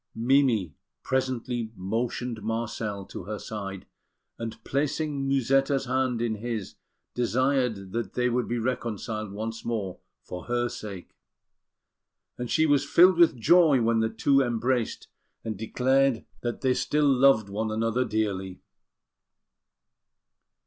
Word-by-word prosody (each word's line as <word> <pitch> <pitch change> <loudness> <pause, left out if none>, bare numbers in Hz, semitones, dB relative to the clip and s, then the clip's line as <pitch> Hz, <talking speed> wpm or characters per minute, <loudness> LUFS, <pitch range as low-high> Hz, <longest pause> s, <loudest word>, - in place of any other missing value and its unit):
Mimi 115 - +2 0.3
presently 125 -3 -2
motioned 115 +4 -3
Marcel 110 -2 -3
to 90 - -8
her 105 +2 -4
side, 100 -3 -6 0.5
and, 115 -1 -5
placing 145 0 -1
Musetta's 135 +1 +2
hand 130 -2 0
in 115 -2 0
his, 110 -3 -4 0.4
desired 125 -5 0
that 115 +1 -3
they 125 0 +1
would 125 0 0
be 120 - -1
reconciled 110 -3 -3
once 110 +2 -5
more 105 -6 -3 0.2
for 90 - -8
her 120 0 0
sake; 100 -6 -8 1.2
and 125 -1 -5
she 160 - +3
was 145 -2 +3
filled 175 +4 +5
with 165 -8 +5
joy 160 0 +5
when 115 -1 +2
the 110 0 +1
two 135 +5 +3
embraced, 120 -1 -1 0.4
and 110 -1 -3
declared 130 +4 +1 0.2
that 120 -1 -3
they 130 -1 +3
still 150 +3 +1
loved 135 -5 +4
one 110 +2 -2
another 115 +3 0
dearly. 95 -5 -2
120 Hz, 125 wpm, -27 LUFS, 110-130 Hz, 1.2 s, filled